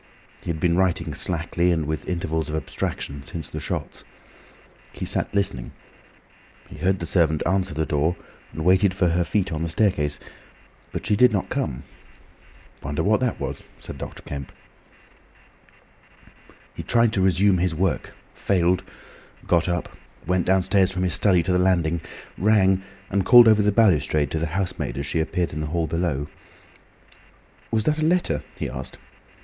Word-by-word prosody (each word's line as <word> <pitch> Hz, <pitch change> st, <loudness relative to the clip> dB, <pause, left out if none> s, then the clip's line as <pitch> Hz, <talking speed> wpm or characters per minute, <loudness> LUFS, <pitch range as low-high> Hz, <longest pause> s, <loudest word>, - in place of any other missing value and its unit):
He -, -, -8 dB
had 80 Hz, -2 st, -2 dB
been 85 Hz, +1 st, +2 dB
writing 90 Hz, -2 st, +1 dB
slackly, 85 Hz, +1 st, -1 dB
and 80 Hz, -3 st, 0 dB
with 80 Hz, +4 st, -4 dB
intervals 80 Hz, -3 st, -2 dB
of 75 Hz, -, -3 dB
abstraction, 70 Hz, -1 st, -4 dB
since 80 Hz, +1 st, -7 dB
the -, -, -4 dB
shots. -, -, -5 dB, 0.9 s
He -, -, -6 dB
sat -, -, 0 dB
listening. 100 Hz, -12 st, -2 dB, 0.9 s
He -, -, -12 dB
heard 95 Hz, +1 st, +1 dB
the 85 Hz, -, -5 dB
servant 80 Hz, -3 st, +1 dB
answer 95 Hz, -2 st, 0 dB
the 80 Hz, 0 st, 0 dB
door, 80 Hz, +3 st, 0 dB, 0.4 s
and 80 Hz, +3 st, -5 dB
waited 95 Hz, +1 st, +4 dB
for 90 Hz, -3 st, +2 dB
her 85 Hz, +1 st, +1 dB
feet 90 Hz, +3 st, -1 dB
on 80 Hz, -1 st, -3 dB
the 85 Hz, -, -2 dB
staircase, 80 Hz, -5 st, +1 dB, 0.7 s
but -, -, -5 dB
she 105 Hz, -, +2 dB
did 125 Hz, +3 st, +5 dB
not 100 Hz, -3 st, -1 dB
come. -, -, -3 dB, 1.0 s
"Wonder 75 Hz, +1 st, -2 dB
what 105 Hz, +2 st, +3 dB
that 125 Hz, -2 st, -1 dB
was," -, -, -5 dB
said -, -, -9 dB
Dr. -, -, -8 dB
Kemp. 70 Hz, -2 st, -7 dB, 2.2 s
He -, -, -6 dB
tried 115 Hz, -1 st, +2 dB
to 95 Hz, -, +1 dB
resume 95 Hz, 0 st, +3 dB
his 90 Hz, -2 st, 0 dB
work, 85 Hz, -4 st, -1 dB, 0.2 s
failed, 90 Hz, -2 st, +1 dB, 0.6 s
got 85 Hz, 0 st, +2 dB
up, 85 Hz, -1 st, -3 dB, 0.3 s
went 90 Hz, +1 st, 0 dB
downstairs 95 Hz, 0 st, +3 dB
from 90 Hz, 0 st, -2 dB
his 90 Hz, -3 st, +1 dB
study 90 Hz, -3 st, +3 dB
to 90 Hz, -, -1 dB
the 90 Hz, -, +3 dB
landing, 85 Hz, -3 st, +2 dB, 0.4 s
rang, 95 Hz, -2 st, +3 dB, 0.3 s
and 100 Hz, 0 st, +1 dB
called 120 Hz, +4 st, +8 dB
over 110 Hz, -1 st, +6 dB
the 105 Hz, 0 st, +3 dB
balustrade 75 Hz, -, +2 dB
to 80 Hz, -, -1 dB
the 80 Hz, -, -1 dB
housemaid 90 Hz, -7 st, -3 dB
as 70 Hz, -, -3 dB
she 75 Hz, +4 st, -1 dB
appeared 85 Hz, +1 st, -1 dB
in 75 Hz, -, -4 dB
the 75 Hz, -, -3 dB
hall 85 Hz, +2 st, -1 dB
below. 80 Hz, -3 st, -1 dB, 1.4 s
"Was 110 Hz, -1 st, 0 dB
that 155 Hz, +5 st, +1 dB
a -, -, 0 dB
letter?" 175 Hz, +3 st, +1 dB
he -, -, -3 dB
asked. -, -, -6 dB
90 Hz, 165 wpm, -23 LUFS, 80-95 Hz, 2.2 s, called